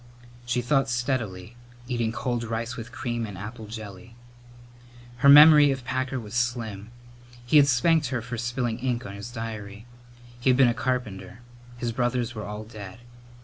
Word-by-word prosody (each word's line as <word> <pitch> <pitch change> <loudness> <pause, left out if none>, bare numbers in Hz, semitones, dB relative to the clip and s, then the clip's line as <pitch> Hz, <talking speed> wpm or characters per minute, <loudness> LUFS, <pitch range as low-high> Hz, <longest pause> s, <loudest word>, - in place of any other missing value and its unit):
She 125 0 0
thought 135 0 +1
steadily, 120 -5 -3 0.3
eating 120 -3 -1
cold 120 0 -2
rice 115 +2 -4
with 120 0 -8
cream 120 -4 -3
and 100 -2 -9
apple 110 +3 -8
jelly. 110 0 -9 1.0
Her 140 +2 +5
memory 150 0 +9
of 135 -2 -3
Packer 130 +2 -2
was 105 -2 -10
slim. 115 -4 -2 0.6
He 135 +5 +4
had 140 -1 +7
spanked 150 +4 +3
her 125 -2 -3
for 125 +1 -5
spilling 120 -1 -2
ink 125 -1 -2
on 100 - -7
his 100 +3 -8
diary. 110 -3 -7 0.5
He 130 - +1
had 125 - +4
been 130 -2 +6
a 120 - +2
carpenter. 125 -3 -4 0.4
His 120 -1 -2
brothers 120 0 -1
were 110 -2 -6
all 105 +1 -6
dead. 105 -4 -10
120 Hz, 165 wpm, -26 LUFS, 110-125 Hz, 1.0 s, memory